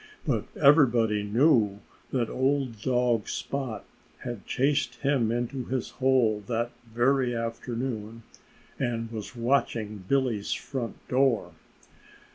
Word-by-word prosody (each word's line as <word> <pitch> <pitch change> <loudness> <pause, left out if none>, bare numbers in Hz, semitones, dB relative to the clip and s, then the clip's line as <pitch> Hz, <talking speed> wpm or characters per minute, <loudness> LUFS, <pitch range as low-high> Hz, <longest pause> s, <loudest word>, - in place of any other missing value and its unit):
But - - 0
everybody 120 -7 +5
knew 105 -2 +3 0.3
that 120 -3 +1
old 130 -4 0
dog 120 -3 +1
Spot 135 -5 -4 0.4
had 120 -5 -6
chased 135 -2 +1
him 130 -3 +1
into 120 +2 -2
his 130 -1 -3
hole 125 -5 +2
that 120 0 -1 0.2
very 125 +1 +2
afternoon, 115 -1 -4 0.6
and 115 -3 -2
was 110 +2 -6
watching 115 -5 0
Billy's 125 -6 +1
front 130 -4 -4
door. 130 -2 +2
120 Hz, 105 wpm, -27 LUFS, 115-130 Hz, 0.6 s, everybody